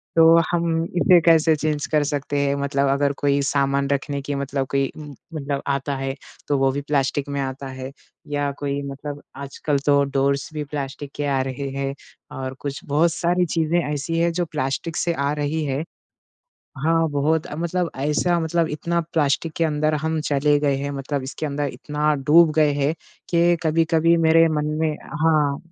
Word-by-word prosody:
तो 165 0 +7
हम 165 -1 +1 0.2
इसे 180 -2 +7
कैसे 165 -1 +5
चेंज 150 -1 -1
कर 150 -2 +3
सकते 145 -1 -2
हैं 140 0 +1
मतलब 140 0 +1
अगर 140 +1 +2
कोई 140 0 +3
सामान 140 0 +1
रखने 140 0 -1
की 145 +1 -4
मतलब 140 -1 -2
कोई 135 0 +2
उम, 150 -2 -9 0.2
मतलब 140 -2 -3
आता 140 0 -1
है 135 0 -3 0.3
तो 145 - +2
वो 135 0 +3
भी 140 +2 -3
प्लास्टिक 140 0 -1
में 140 0 -2
आता 135 0 -4
है 130 0 -7 0.4
या 145 -1 -1
कोई 140 0 -2
मतलब 145 +1 -7
आजकल 140 +1 -2
तो 140 -1 +4
डोर्स 140 0 +1
भी 150 -1 -3
प्लास्टिक 140 -1 -6
के 145 - -2
आ 135 -2 +1
रहे 135 +1 -4
हैं 135 0 -2 0.4
और 130 0 -4
कुछ 140 -1 -5
बहुत 160 +2 +2
सारी 175 +2 +1
चीज़ें 165 +1 +1
ऐसी 150 +2 -2
हैं 170 0 +2
जो 175 +1 0
प्लास्टिक 150 +3 -2
से 170 - 0
आ 140 -2 -1
रही 150 +1 -1
है 140 +2 -1 1.0
हाँ, 165 0 +3
बहुत 150 +2 +1
अ, - - -7
मतलब 170 +1 -1
ऐसा 150 +5 +1
मतलब 165 0 0
इतना 170 +3 -1
प्लास्टिक 155 +1 +1
के 165 - +2
अंदर 155 0 +1
हम 160 +1 -1
चले 145 +1 +2
गए 145 -2 +2
हैं, 140 +1 -3
मतलब 140 0 -3
इसके 135 +4 -5
अंदर 145 0 -2
इतना 150 0 -1
डूब 155 +4 +5
गए 150 -2 +4
हैं 145 +1 +1 0.4
कि 170 0 +4
कभी-कभी 165 +1 +3
मेरे 165 0 +5
मन 150 -1 -1
में 155 -2 0 0.3
हाँ, 150 -3 +3
145 Hz, 185 wpm, -22 LUFS, 140-160 Hz, 1.0 s, तो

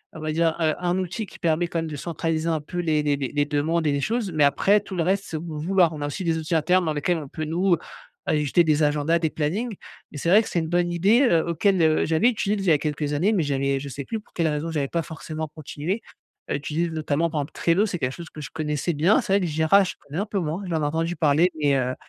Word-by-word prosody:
on - - -7
va 155 0 -3
dire, 165 0 +1
heu, 155 -1 +3
un 180 0 0
outil 190 +4 -3
qui - - -13
permet 165 +1 +1
quand 170 - -4
même 165 - -3
de 150 - -6
centraliser 165 +1 -2
un 160 -2 0
peu 175 +4 -6
les 155 -3 +1
les 145 -1 +2
les 140 -1 -3
les 145 0 +1
demandes 155 +3 0
et - - +3
les 140 0 0
choses, 220 - -1
mais 155 -2 +2
après 195 +8 +4
tout 195 - -8
le 170 - +1
reste, 195 +3 0
c'est 160 - -4
au - - -6
bon 160 -2 -6
vouloir. 175 0 +3
On 150 - -7
a 145 - -1
aussi 165 +6 -4
des 165 -2 +1
outils 160 +1 -2
internes 180 +3 +3
dans 155 - 0
lesquels 165 +4 0
on 150 - -8
peut, 155 +3 -5
nous, 175 +3 +2 0.5
ajouter 150 +3 +2
des 155 -1 +2
agendas, 150 +3 +2
des 160 -1 0
plannings, 200 +10 -2 0.4
et - - -6
c'est 165 - -1
vrai 205 +5 +7
que - - -8
c'est 170 - 0
une 160 - -3
bonne 175 0 +1
idée, 205 +9 +4
heu, 170 -11 +3
auquel, 185 +2 +2
heu, 155 -1 +3
j'avais 160 +9 +3
utilisé 210 -3 -1
il 195 - -3
y 165 - +6
a 150 - +5
quelques 150 0 -2
années, 180 +9 +2
mais 180 -7 +2
j'avais 140 -1 0
je 140 - -6
sais 140 +1 -6
plus 225 - -3
pour - - -30
quelle 165 -2 +1
raison 155 +2 -2
j'avais 145 -3 -1
pas 170 - -1
forcément 155 -1 -6
continué 155 +6 -4 0.5
à - - -1
utiliser. 155 +4 -2
Notamment, 155 +1 0
par 150 - -1
exemple, 140 - -7
Trello, 175 +5 +2
c'est 180 -3 -4
quelque 130 -2 -1
chose 170 +2 -9
que - - -11
je 135 - -7
connaissais 155 +1 -1
bien, 165 +8 +3
c'est 195 - -1
vrai 200 - +5
que - - 0
Jira, 160 +5 +4
je 185 - -3
connais 150 +5 -6
un 200 - 0
peu 205 -1 -1
moins, 170 +3 -3
j'en 160 -2 0
ai - - +2
entendu 165 +3 -1
parler 155 +4 +3
mais, 145 -1 +3
heu, 130 0 -1
160 Hz, 285 wpm, -24 LUFS, 150-175 Hz, 0.5 s, vrai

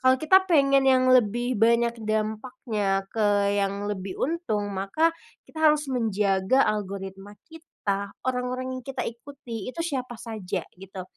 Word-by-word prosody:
Kalau 260 0 +5
kita 375 +7 +4
pengen 275 -4 +4
yang 255 -1 +4
lebih 240 0 +2
banyak 235 0 +3
dampaknya 215 -2 -1
ke 205 -2 +2
yang 200 0 -1
lebih 190 -1 -5
untung, 255 - -2
maka 195 +13 +1 0.3
kita 315 - -12
harus 300 -2 -1
menjaga 210 0 +2
algoritma 195 -1 -6 0.2
kita, 200 -11 -5
orang-orang 255 0 -2
yang 255 - -10
kita 265 -2 -3
ikuti, 235 -2 -7
itu 335 - -6
siapa 260 -7 -3
saja 210 -6 -5 0.2
gitu. 190 0 -8
230 Hz, 135 wpm, -26 LUFS, 200-260 Hz, 0.3 s, Kalau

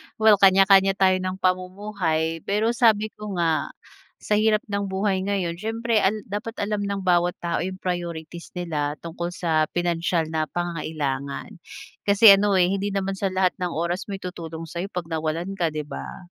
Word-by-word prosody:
Well, 220 -3 +5
kanya-kanya 195 0 +6
tayo 185 -1 +3
ng 185 0 -3
pamumuhay. 185 -3 -1
Pero 215 +3 +1
sabi 220 -3 +3
ko 210 -3 -7
nga 165 -2 +1 0.5
sa - - -3
hirap 215 0 +3
ng 200 -2 -3
buhay 190 0 0
ngayon 190 -4 -1
siyempre 225 0 0
al 210 +2 0
dapat 210 +3 -5
alam 205 0 -1
ng 200 -1 -3
bawat 175 -1 +2
tao 170 -1 -2
yung 185 +1 -4
priorities 170 -2 -5
nila 150 -4 -2
tungkol 170 +2 -5
sa 160 -3 0
pinansiyal 170 -1 0
na 155 -1 0
pangangailangan. 155 - -3 0.6
Kasi 200 +1 +8
ano, 200 0 +3
eh, 180 - +5
hindi 195 +1 -1
naman 195 -1 -2
sa 195 +1 -1
lahat 185 -1 +1
ng 180 - 0
oras 170 +5 -2
may 195 - -3
tutulong 165 -2 -6
sa'yo 170 +4 -5
'pag 180 -3 -4
nawalan 165 +3 -3
ka, 175 -4 0
'di 155 -1 -4
ba? 150 +5 -8
185 Hz, 170 wpm, -24 LUFS, 170-200 Hz, 0.6 s, Kasi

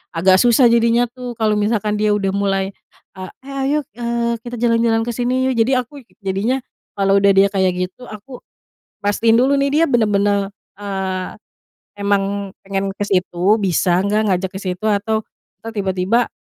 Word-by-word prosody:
agak 185 +2 +4
susah 240 0 +5
jadinya 235 +1 +3
tuh 250 -1 -7
kalo 215 -2 +1
misalkan 210 0 0
dia 210 -1 +2
udah 200 -2 0
mulai 195 -1 0 0.5
ah, 185 - -7 0.2
"Eh, 275 - -9
ayo, 290 +2 +1 0.2
eee, 235 0 -1
kita 245 0 -6
jalan-jalan 230 -1 +2
ke 240 - -2
sini, 250 +2 0
yuk!" - - 0
Jadi 235 +4 +3
aku, 255 +3 -5 0.2
jadinya, 200 +7 0 0.4
kalo 195 0 +3
udah 200 - +5
dia 195 +1 +6
kayak 190 -2 +2
gitu, 220 +7 -14
aku 240 +5 -10 0.6
pastiin 225 +3 +2
dulu 265 +4 +3
nih, 280 0 +1
dia - - +5
benar-benar, 205 -3 +1 0.3
eee, 190 -2 -3 0.7
emang 200 -1 -1
pengen 195 0 -3
ke 195 - -29
situ, 185 +2 +2
bisa 180 0 +2
nggak 210 +2 +1
ngajak 185 0 0
ke 190 - -6
situ, 185 +1 -5
atau, 215 +1 0 0.4
ntar 225 - -6
tiba-tiba, 195 +3 0
205 Hz, 165 wpm, -19 LUFS, 195-235 Hz, 0.7 s, dia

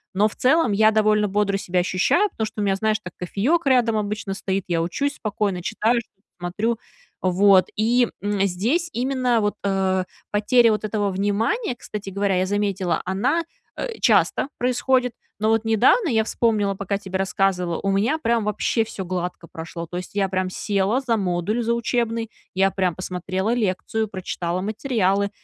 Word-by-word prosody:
Но 210 +2 +4
в - - -8
целом 270 -2 +3
я 215 +2 +5
довольно 215 -1 +3
бодро 200 0 +1
себя 180 -2 -1
ощущаю, 195 - +2
потому 220 - -2
что 215 - -6
у - - +1
меня, 195 - +2
знаешь, 215 +2 +1
так 180 - -8
кофеек 265 - 0
рядом 240 -4 +3
обычно 210 -1 -2
стоит, 195 0 -2
я 170 -2 0
учусь 280 - -1
спокойно, 200 -4 -2
читаю 230 +6 +1
что-то, 205 -2 -27
смотрю. 210 +7 -1 0.4
Вот, 185 0 +4
и, 240 +3 +3 0.2
м, 205 -1 -1
здесь 240 - 0
именно 250 -2 +1
вот, 205 -1 0
э, 190 -2 +1 0.3
потеря 225 +3 +4
вот 215 - -1
этого 205 -2 -1
внимания, 215 - 0
кстати 210 -4 -7
говоря, 195 -1 0
я 185 - +1
заметила, 195 -4 -1
она, 205 - 0 0.3
э, 460 -2 -5
часто - - +3
происходит, 250 0 +1 0.3
но 215 - +2
вот 225 0 +2
недавно, 240 - +3
я 220 -2 +2
вспомнила, 215 -4 +1
пока 200 +1 -2
тебе 190 -2 -4
рассказывала, 190 -3 0
у 195 - 0
меня 220 +11 +1
прям 230 -6 +1
вообще 210 +2 0
всё 195 -4 -6
гладко 180 -1 -4
прошло. 165 +1 -7
То 175 - -7
есть 180 0 -6
я 200 -1 +1
прям 185 0 -1
села 200 +5 0
за 245 -4 0
модуль 195 +4 -1
за 235 +1 +1
учебный, 230 -1 -1 0.3
я 195 0 +3
прям 185 -3 0
посмотрела 185 +4 -2
лекцию, 220 0 -1
прочитала 180 -2 -3
материалы, 200 -2 0
205 Hz, 170 wpm, -23 LUFS, 190-230 Hz, 0.4 s, я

